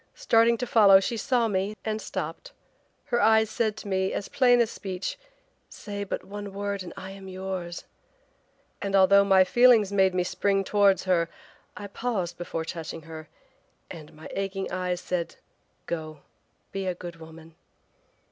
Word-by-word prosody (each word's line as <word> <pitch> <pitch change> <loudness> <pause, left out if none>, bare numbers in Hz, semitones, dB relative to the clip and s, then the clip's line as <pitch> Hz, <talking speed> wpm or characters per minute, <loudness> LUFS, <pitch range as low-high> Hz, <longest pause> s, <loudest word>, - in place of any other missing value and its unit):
Starting 230 +1 +3
to 250 - -3
follow 205 -5 +7
she 215 +4 -2
saw 235 +1 +1
me, 200 0 -1
and 220 0 -2
stopped. - - -6 0.5
Her 240 -4 0
eyes 220 0 +4
said 220 -1 -1
to 220 - -9
me 190 -1 0
as 200 - -4
plain 245 -2 +4
as 235 -2 +2
speech, 185 -2 -5 0.5
'Say 205 -1 -6
but - - -4
the 205 +2 -7
word 200 0 -4
and 180 - -7
I 190 - -7
am 195 0 -11
yours,' 185 -2 -5 1.0
and 200 0 -1
although 195 +1 +6
my 190 -1 +5
feelings 230 0 +5
made 190 -2 +3
me 180 - +2
spring 195 +2 0
towards 200 -1 +3
her, 170 -3 +1 0.5
I 205 - -7
paused 200 -5 -3
before 165 -2 -4
touching 165 -1 -6
her 160 -1 -10 0.6
and 155 -2 -10
my 155 - -10
aching 195 0 -3
eyes 180 -1 -2
said: 180 -2 -3 0.5
'Go! 155 -3 -5 0.5
be 195 -1 -4
a 180 - -1
good 175 -1 -9
woman.' 160 0 -13
195 Hz, 160 wpm, -26 LUFS, 180-210 Hz, 1.0 s, follow